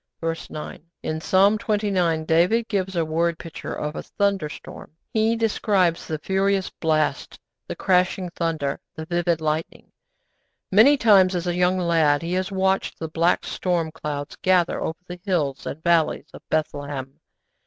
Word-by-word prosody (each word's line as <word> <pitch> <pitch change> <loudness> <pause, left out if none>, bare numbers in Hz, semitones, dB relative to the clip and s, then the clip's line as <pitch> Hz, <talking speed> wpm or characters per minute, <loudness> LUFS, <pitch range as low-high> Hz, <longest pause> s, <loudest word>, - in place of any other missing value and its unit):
_' - - -58
(Verse 165 0 -4
9.) 150 0 -8 0.2
In 155 0 -3
Psalm 200 +5 +4
xxix. 190 -7 0
David 180 +9 +3
gives 190 -3 -2
a 165 -1 +1
word 165 +1 0
picture 165 - -7
of 150 +1 -4
a - - -4
thunderstorm. 195 -8 -3 0.2
He 220 +1 +2
describes 205 -6 +1
the 155 - -2
furious 190 +3 0
blast, 155 -3 -1 0.3
the - - -5
crashing 185 -1 +1
thunder, 165 -5 -2 0.2
the 160 - -6
vivid 170 -1 0
lightning. 155 +1 -3 0.8
Many 235 +9 +6
times 195 -6 +5
as 175 0 -2
a 175 - 0
young 180 +1 +2
lad 165 -4 +2
he 170 +2 -3
had 185 +1 -1
watched 190 0 0
the 160 - -5
black 165 +2 +1
storm 170 -3 -1
clouds 150 -2 -5
gather 180 -2 +2
over 160 - -3
the 180 0 -8
hills 155 -9 -1
and 160 - -6
valleys 170 -2 +2
of - - -11
Bethlehem. 145 -3 -3
170 Hz, 155 wpm, -23 LUFS, 160-190 Hz, 0.8 s, Many